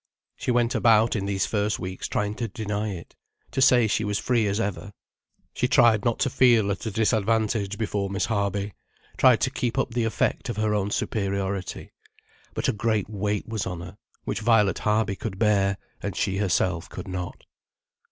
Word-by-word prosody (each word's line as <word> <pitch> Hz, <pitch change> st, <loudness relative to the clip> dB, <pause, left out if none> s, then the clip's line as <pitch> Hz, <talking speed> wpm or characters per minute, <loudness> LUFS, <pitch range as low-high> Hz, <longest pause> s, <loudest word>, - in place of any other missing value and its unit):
She -, -, -5 dB
went 120 Hz, 0 st, +2 dB
about 115 Hz, -1 st, +4 dB
in 100 Hz, -2 st, -2 dB
these 100 Hz, -1 st, 0 dB
first 105 Hz, -1 st, 0 dB
weeks 95 Hz, 0 st, -5 dB
trying 105 Hz, 0 st, -1 dB
to 115 Hz, -, -2 dB
deny 105 Hz, +1 st, -3 dB
it, 90 Hz, -4 st, -8 dB, 0.4 s
to 135 Hz, -, -1 dB
say 125 Hz, -3 st, +6 dB
she 110 Hz, 0 st, 0 dB
was 105 Hz, -1 st, -1 dB
free 115 Hz, -2 st, +1 dB
as 100 Hz, +2 st, 0 dB
ever. 100 Hz, -1 st, -3 dB, 0.6 s
She 125 Hz, -, 0 dB
tried 120 Hz, -6 st, +4 dB
not 120 Hz, -1 st, +1 dB
to -, -, +2 dB
feel 120 Hz, -6 st, +4 dB
at 100 Hz, -, -4 dB
a -, -, 0 dB
disadvantage 110 Hz, -1 st, +1 dB
before 100 Hz, -3 st, -2 dB
Miss 100 Hz, +2 st, -1 dB
Harby, 100 Hz, -2 st, -1 dB, 0.4 s
tried -, -, +5 dB
to -, -, +1 dB
keep 120 Hz, +1 st, -2 dB
up 130 Hz, -3 st, 0 dB
the 120 Hz, -1 st, 0 dB
effect 115 Hz, -, -1 dB
of 120 Hz, -, -3 dB
her 110 Hz, -1 st, +1 dB
own 100 Hz, -1 st, 0 dB
superiority. 100 Hz, -3 st, -2 dB, 0.6 s
But -, -, -1 dB
a -, -, +2 dB
great 110 Hz, -1 st, -1 dB
weight 105 Hz, 0 st, -2 dB
was 110 Hz, -4 st, -3 dB
on 90 Hz, -2 st, -5 dB
her, 95 Hz, +4 st, -10 dB, 0.2 s
which 105 Hz, -, -3 dB
Violet 105 Hz, -4 st, +3 dB
Harby 105 Hz, -2 st, +1 dB
could 95 Hz, -1 st, -5 dB
bear, 100 Hz, -2 st, +2 dB, 0.2 s
and -, -, -4 dB
she 95 Hz, -, 0 dB
herself 90 Hz, -3 st, 0 dB
could -, -, -8 dB
not. 90 Hz, -1 st, -6 dB
105 Hz, 185 wpm, -25 LUFS, 100-115 Hz, 0.6 s, say